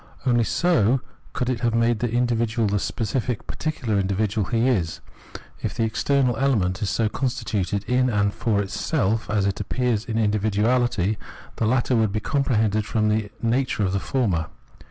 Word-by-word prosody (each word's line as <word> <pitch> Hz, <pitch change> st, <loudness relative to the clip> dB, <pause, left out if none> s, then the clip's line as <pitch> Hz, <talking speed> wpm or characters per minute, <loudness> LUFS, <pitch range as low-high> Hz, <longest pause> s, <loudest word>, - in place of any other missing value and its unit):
Only 120 Hz, -3 st, +3 dB
so 130 Hz, -, +2 dB, 0.3 s
could 125 Hz, -, -2 dB
it 125 Hz, -2 st, -1 dB
have 115 Hz, -2 st, 0 dB
made 115 Hz, -1 st, +2 dB
the 120 Hz, 0 st, 0 dB
individual 115 Hz, -2 st, +1 dB
the 100 Hz, 0 st, +1 dB
specific 115 Hz, -, -2 dB
particular 125 Hz, -9 st, -2 dB
individual 100 Hz, +1 st, 0 dB
he 115 Hz, +1 st, +1 dB
is. 90 Hz, -11 st, 0 dB, 0.6 s
If -, -, -3 dB
the 115 Hz, -, 0 dB
external 125 Hz, +3 st, +1 dB
element 105 Hz, -9 st, +1 dB
is 100 Hz, -, 0 dB
so 110 Hz, +4 st, +1 dB
constituted 105 Hz, -5 st, -2 dB
in 125 Hz, +3 st, +2 dB
and 100 Hz, -2 st, +1 dB
for 105 Hz, -3 st, 0 dB
itself 110 Hz, +1 st, -1 dB
as 105 Hz, -2 st, +1 dB
it 100 Hz, -2 st, -1 dB
appears 120 Hz, +1 st, -1 dB
in 115 Hz, -1 st, -3 dB
individuahty, 110 Hz, 0 st, +1 dB, 0.4 s
the 115 Hz, -, +1 dB
latter 125 Hz, +1 st, +2 dB
would 110 Hz, -3 st, +2 dB
be 110 Hz, -, -1 dB
comprehended 110 Hz, -5 st, +1 dB
from 110 Hz, +1 st, 0 dB
the 105 Hz, -1 st, 0 dB
nature 120 Hz, -1 st, +1 dB
of 95 Hz, -1 st, 0 dB
the 100 Hz, -, +1 dB
former. 95 Hz, -, 0 dB
110 Hz, 165 wpm, -24 LUFS, 105-125 Hz, 0.6 s, Only